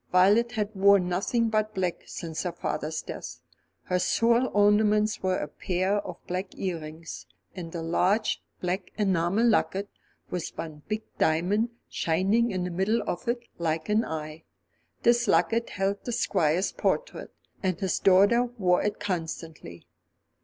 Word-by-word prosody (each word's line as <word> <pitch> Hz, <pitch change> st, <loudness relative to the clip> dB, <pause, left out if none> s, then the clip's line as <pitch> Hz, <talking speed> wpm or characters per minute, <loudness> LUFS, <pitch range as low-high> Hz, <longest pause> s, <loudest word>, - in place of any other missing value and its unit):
Violet 205 Hz, +6 st, +4 dB
had 215 Hz, -2 st, -2 dB
worn 200 Hz, -2 st, +5 dB
nothing 225 Hz, +6 st, 0 dB
but 215 Hz, 0 st, 0 dB
black 180 Hz, -2 st, -1 dB
since 160 Hz, -2 st, -5 dB
her 180 Hz, -, -2 dB
father's 160 Hz, -2 st, -3 dB
death. -, -, -7 dB, 0.4 s
Her 180 Hz, 0 st, 0 dB
sole 235 Hz, +6 st, +3 dB
ornaments 210 Hz, +1 st, +3 dB
were 185 Hz, -1 st, +1 dB
a -, -, -3 dB
pair 185 Hz, +6 st, -1 dB
of 205 Hz, -, -5 dB
black 185 Hz, +1 st, -4 dB
earrings, 165 Hz, -, -5 dB, 0.3 s
and 170 Hz, -2 st, -7 dB
a 165 Hz, -, -3 dB
large 185 Hz, +6 st, +1 dB, 0.2 s
black 180 Hz, +1 st, -2 dB
enamel 195 Hz, +1 st, +2 dB
locket, 200 Hz, -2 st, +1 dB, 0.4 s
with 180 Hz, -2 st, -3 dB
one 155 Hz, -2 st, -7 dB
big 215 Hz, +1 st, -2 dB, 0.2 s
diamond 185 Hz, +9 st, +2 dB, 0.2 s
shining 195 Hz, +8 st, +1 dB
in 185 Hz, -4 st, -2 dB
the 180 Hz, -, -3 dB
middle 190 Hz, +6 st, +1 dB
of 175 Hz, -, -4 dB
it, 235 Hz, 0 st, -1 dB, 0.2 s
like 160 Hz, 0 st, -1 dB
an 215 Hz, +2 st, +3 dB
eye. 155 Hz, -2 st, -5 dB, 0.6 s
This 240 Hz, 0 st, +4 dB
locket 230 Hz, +1 st, +2 dB
held 195 Hz, +1 st, -2 dB
the 245 Hz, -, -4 dB
Squire's 185 Hz, -5 st, +1 dB
portrait, -, -, -2 dB, 0.3 s
and 185 Hz, -3 st, -1 dB
his 190 Hz, -3 st, 0 dB
daughter 200 Hz, +6 st, +5 dB
wore 180 Hz, -3 st, +3 dB
it 210 Hz, 0 st, -2 dB
constantly. 160 Hz, -, -5 dB
190 Hz, 145 wpm, -27 LUFS, 170-215 Hz, 0.6 s, worn